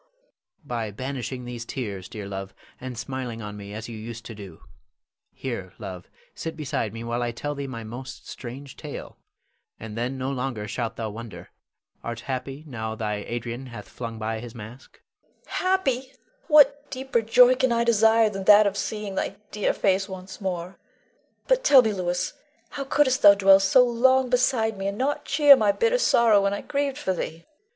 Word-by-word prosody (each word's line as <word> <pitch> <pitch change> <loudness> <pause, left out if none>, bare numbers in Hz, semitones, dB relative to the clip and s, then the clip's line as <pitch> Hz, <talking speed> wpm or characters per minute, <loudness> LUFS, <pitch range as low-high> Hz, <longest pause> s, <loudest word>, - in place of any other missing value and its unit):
_] - - -38 0.2
Louis. - - -41 0.3
By 115 -5 -3
banishing 130 +2 -5
these 120 -1 -6
tears, 100 -7 -5
dear 105 -2 -7
love, 95 0 -6 0.2
and 130 -2 -7
smiling 120 -1 -5
on 105 0 -6
me 100 0 -9
as 110 +2 -6
you 115 - -7
used 115 +1 -8
to 115 - -7
do. 100 -6 -11 0.7
Here, 110 -9 -6
love, 90 -2 -8 0.2
sit 160 -1 -6
beside 140 -8 -2
me 115 +2 -7
while 120 +1 -2
I 120 - 0
tell 145 +5 -4
thee 140 -1 -5
my 115 -3 -6
most 120 +4 -9
strange 130 +2 -8
tale, - - -8 0.6
and 110 -1 -8
then 120 +3 -2
no 130 +1 -2
longer 125 -5 -3
shalt 115 +2 -3
thou 110 -2 -4
wonder. 115 0 -9 0.5
Art 115 0 -5
happy 135 +2 -5
now 110 -6 -5
thy 105 -1 -2
Adrian 120 +2 -5
hath 110 -4 -9
flung 115 -2 -7
by 110 0 -3
his 120 +1 -9
mask? 115 +4 -11 0.4
Leonore. - - -20
Happy! 270 -9 0 0.3
What 290 -2 +5
deeper 260 -2 -1
joy 245 +3 +6
can 260 -1 +1
I 235 0 +2
desire 225 -1 +4
than 195 -1 -5
that 210 +1 +8
of 200 -1 0
seeing 210 -2 -3
thy 190 - -2 0.2
dear 210 -1 +1
face 195 0 +1
once 190 +1 -9
more? 180 -1 -4 0.7
But - - +3
tell 270 - +7
me, 220 -2 0
Louis, 180 -2 -2 0.4
how 280 -1 -5
couldst 270 -1 +2
thou 200 -1 +9
dwell 195 -1 +6
so 195 +6 +5
long 255 +2 +3
beside 230 -4 +2
me 195 - -2
and 200 +1 -3
not 275 +4 -1
cheer 285 -1 +7
my 215 -5 +3
bitter 465 - +1
sorrow 225 - +5
when 200 0 +1
I - - -5
grieved 280 -1 -2
for 190 -10 -1
thee. 165 -1 -5
145 Hz, 190 wpm, -25 LUFS, -, 0.7 s, thou